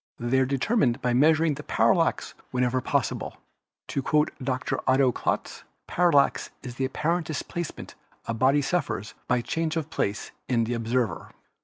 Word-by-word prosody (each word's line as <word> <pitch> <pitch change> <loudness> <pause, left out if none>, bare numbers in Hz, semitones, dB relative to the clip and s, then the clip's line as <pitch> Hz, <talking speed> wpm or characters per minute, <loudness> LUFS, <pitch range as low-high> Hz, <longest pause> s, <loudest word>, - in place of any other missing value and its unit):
They 120 +3 +1
are 130 - +2
determined 135 - +1
by 125 -1 +2
measuring 155 +4 +4
the 145 - -7
parallax 165 +1 +2 0.2
wherever 125 0 0
pos - - +1
sible. - - -6 0.5
To 140 - -1
quote 150 +3 +2
Dr. 130 0 -1
Otto 130 -1 +4
Klotz, - - -3 0.2
"Parallax 170 -6 +2
is 125 -2 -6
the 130 +2 -1
apparent 160 +6 -1
displacement 160 +2 -5 0.3
a 115 - -2
body 135 +5 +3
suffers 135 - -2
by 125 -1 +2
change 160 +5 -2
of 160 -1 -3
place 100 +1 -2 0.2
in 120 -3 +2
the 115 +2 -2
ob 115 -1 -4
server. 120 -1 -1
130 Hz, 160 wpm, -26 LUFS, 125-155 Hz, 0.5 s, measuring